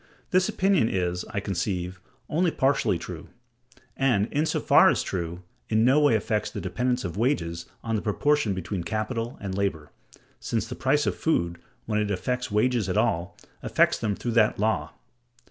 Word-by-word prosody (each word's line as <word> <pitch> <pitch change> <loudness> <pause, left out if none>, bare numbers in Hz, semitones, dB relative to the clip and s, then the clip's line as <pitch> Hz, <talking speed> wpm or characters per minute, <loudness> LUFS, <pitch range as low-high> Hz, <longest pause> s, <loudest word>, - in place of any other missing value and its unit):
This 185 0 +3
opinion 185 - +2
is, 90 -2 -1
I 100 - -2
conceive, 90 -2 -3 0.3
only 175 +3 +2
partially 135 -3 +1
true; - - -8 0.7
and, 120 -7 +2
in 150 +2 +1
so - - 0
far - - +6
as - - +1
true, 85 -1 -4 0.3
in 110 +1 +3
no 135 +4 +5
way 145 -6 +4
affects 110 0 -1
the 105 - -6
dependence 125 +6 -1
of 85 +1 -5
wages 85 - -1 0.2
on 115 -1 -1
the 105 - -1
proportion 115 0 +1
between 95 0 -4
capital 110 +5 -3
and 100 -2 -5
labor: 95 -7 -2 0.5
since - - -2
the - - -6
price 145 +4 +1
of - - +1
food, 85 - 0 0.3
when 105 -1 0
it 105 -1 0
affects 125 +6 -2
wages 110 -1 +1
at 90 - 0
all, 85 +1 0 0.2
affects - - +2
them 105 -2 -1
through 120 - -3
that 110 -2 +3
law. 95 -9 0
105 Hz, 175 wpm, -26 LUFS, 90-125 Hz, 0.7 s, far